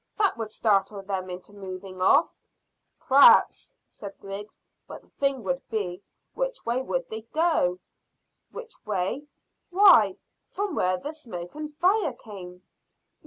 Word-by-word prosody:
That 410 -3 +2
would 225 -2 -5
startle 200 -2 0
them 190 -1 -4
into 180 +3 -9
moving 185 -1 -8
off." 280 - +3 0.6
"P'r'aps," 280 - +5
said 200 -2 -11
Griggs; 200 +2 -8 0.3
"but - - -10
the - - -27
thing 275 -3 -1
would 265 +7 -2
be, 200 -5 -3 0.3
which - - -3
way 240 +2 0
would 175 -8 -3
they 220 0 -4
go?" 315 - +2 0.7
"Which 470 -1 -9
way? 210 +8 -2 0.4
Why, 350 - +6 0.3
from 405 -2 -3
where 185 -8 +1
the 290 +12 -6
smoke 180 - -8
and 300 0 -7
fire 370 - +2
came." 185 -6 -11
215 Hz, 135 wpm, -26 LUFS, 185-300 Hz, 0.7 s, Why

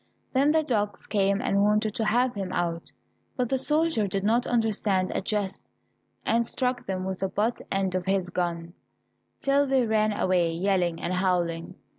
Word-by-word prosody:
Then 275 +3 +4
the 315 0 +3
dogs 210 -7 -1
came 200 -1 +1
and 200 0 +2
wanted 210 +1 +2
to 220 - -1
have 245 +3 +2
him 195 -2 -4
out, 170 -1 -2 0.5
but 250 -2 0
the 265 - +1
soldier 300 -4 +2
did 195 0 -2
not 230 +4 +2
understand 210 -5 +1
a - - -1
jest, 200 -1 -3 0.6
and 230 +1 +2
struck 250 +1 -1
them 185 -1 -2
with 190 -1 -3
the 195 - -1
butt 220 +5 -1
end 195 -1 0
of 185 -1 -2
his 190 -2 0
gun, 170 -1 -3 0.7
till 280 +1 +2
they 265 -2 +2
ran 215 -1 +2
away 180 -4 +1
yelling 175 -1 0
and 175 - -2
howling. 180 -2 -1
200 Hz, 175 wpm, -26 LUFS, 185-235 Hz, 0.7 s, Then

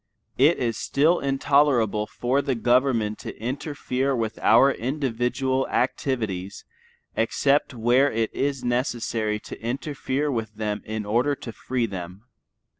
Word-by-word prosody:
It 150 +6 +5
is 115 -3 -1
still 160 +5 +2
intolerable 135 -6 +2
for 130 +3 0
the 140 -2 -1
government 120 -3 +2
to - - -8
interfere 135 +1 -2
with 110 -2 -3
our 120 +5 +5
individual 130 0 -1
activities 100 -8 -2 0.5
except 140 +4 +1
where 120 +5 +3
it 115 0 -1
is 135 -2 -1
necessary 120 -3 -1
to - - -10
interfere 135 +3 -2
with 110 -3 -3
them 105 -1 -3
in 110 -1 -4
order 120 +7 +1
to 120 - -8
free 125 +1 -2
them. 95 -1 -7
125 Hz, 125 wpm, -24 LUFS, 110-135 Hz, 0.5 s, It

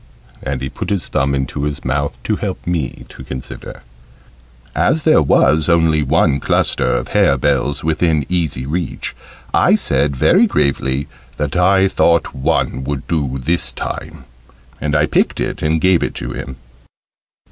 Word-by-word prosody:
And 65 -1 -3
he 65 - -3
put 65 - -6
his 100 -4 -2
thumb 70 +1 +1
into 70 +1 -2
his 75 -1 -4
mouth 70 +2 -1
to - - -1
help - - -4
me 85 -7 -3
to - - -11
consider. 65 0 -8 0.9
As 160 - +1
there 155 - +5
was 75 +2 +3
only 80 -2 +3
one 75 0 +2
cluster - - +1
of - - -3
hare 70 - +3
bells 70 +1 0
within 80 -2 +1
easy 80 -8 -1
reach, 85 +5 -3 0.4
I - - +4
said 70 +1 +1
very 190 - +4
gravely 70 - 0 0.3
that 75 +1 -2
I 95 +2 +4
thought 85 -3 +2
one 65 0 -1
would 70 0 -4
do 70 -6 -1
this 80 +7 0
time, - - -6 0.6
and 75 -2 -1
I 75 0 +4
picked - - 0
it - - -3
and 80 +1 +1
gave 90 +1 +3
it - - -2
to - - -5
him. 65 +2 -6
75 Hz, 160 wpm, -17 LUFS, 65-85 Hz, 0.9 s, there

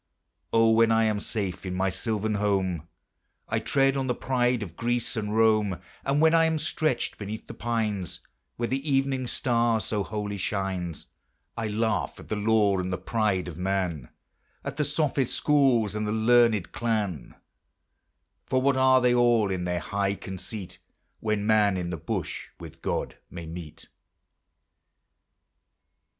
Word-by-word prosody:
O, 115 0 +5
when 115 0 +5
I 115 0 +4
am 110 -2 +1
safe 100 -4 -4
in 90 -1 -4
my 95 +1 +1
sylvan 110 0 -1
home, 95 -5 0 0.6
I - - 0
tread 135 0 +2
on 135 -1 -1
the 125 - 0
pride 125 -3 +1
of 85 -5 -9
Greece 120 +3 -1
and 105 -1 -2
Rome; 110 -4 +3 0.2
And 140 +1 +1
when 160 +1 +5
I 165 0 +5
am 160 0 +1
stretched 155 -3 -1
beneath 105 +1 -6
the - - -9
pines, 110 -5 -2 0.4
Where 120 - -1
the 135 +2 -1
evening 135 -2 +1
star 120 -3 +1
so 105 -1 -2
holy 105 +1 -4
shines, 95 -4 -3 0.5
I 115 -2 -2
laugh 105 -3 -1
at - - -13
the - - 0
lore 105 -2 +3
and 90 +1 -3
the 90 - -1
pride 100 0 0
of 85 -1 -7
man, 90 -8 -1 0.5
At 140 0 -5
the 150 - +1
sophist 145 -3 0
schools, 130 -8 +3
and 105 0 -2
the - - -1
learned 110 -3 +3
clan; 105 - -2 1.1
For 130 - +2
what 135 +1 +2
are 130 0 +5
they 125 -1 +4
all 120 -4 +3
in 90 -2 -2
their 90 0 -1
high 100 +3 -1
conceit, 95 +1 -7 0.4
When 105 -2 -1
man 105 -3 +4
in 90 -1 -3
the 85 - -3
bush - - -4
with - - -11
God - - -2
may 85 -2 -8
meet? 80 -1 -9
110 Hz, 160 wpm, -27 LUFS, 95-120 Hz, 1.1 s, O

